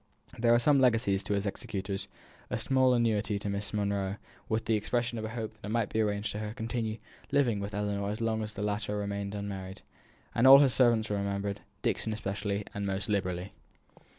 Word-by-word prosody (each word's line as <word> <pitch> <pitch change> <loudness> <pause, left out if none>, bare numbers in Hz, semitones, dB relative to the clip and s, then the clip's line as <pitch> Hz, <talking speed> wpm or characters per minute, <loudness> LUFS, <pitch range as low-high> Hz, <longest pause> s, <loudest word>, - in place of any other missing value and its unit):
There 115 0 +4
were 120 +5 +5
legacies 115 -7 +3
to 105 -1 0
his 100 +1 -1
executors; 100 -1 -3 0.4
a - - -1
small 130 -1 +3
annuity 110 -3 +1
to 100 0 -4
Miss 100 +1 -3
Monro, 100 -2 -1 0.3
with 110 0 0
the 115 - +1
expression 120 +2 0
of 110 - -4
a - - -4
hope 110 -1 -4
that 110 0 -13
it - - -4
might 115 -1 0
be 110 - +1
arranged 105 0 -1
for 105 - -4
her 105 - -3
to - - -7
continue 110 -1 -2 0.3
living 125 -7 +2
with 100 0 -5
Ellinor 100 -1 -1
as 105 - -3
long 110 -1 0
as 110 0 -5
the 100 - -4
latter 105 0 -1
remained 100 0 -3
unmarried; 95 -2 -6 0.5
all 130 +3 +9
his 140 -3 +5
servants 115 -4 +3
were 105 - +1
remembered, 100 0 -2 0.2
Dixon 110 - 0
especially, 100 -1 -2
and 100 - -3
most 95 +2 -2
liberally. 95 -2 -1
105 Hz, 200 wpm, -30 LUFS, 100-115 Hz, 0.5 s, all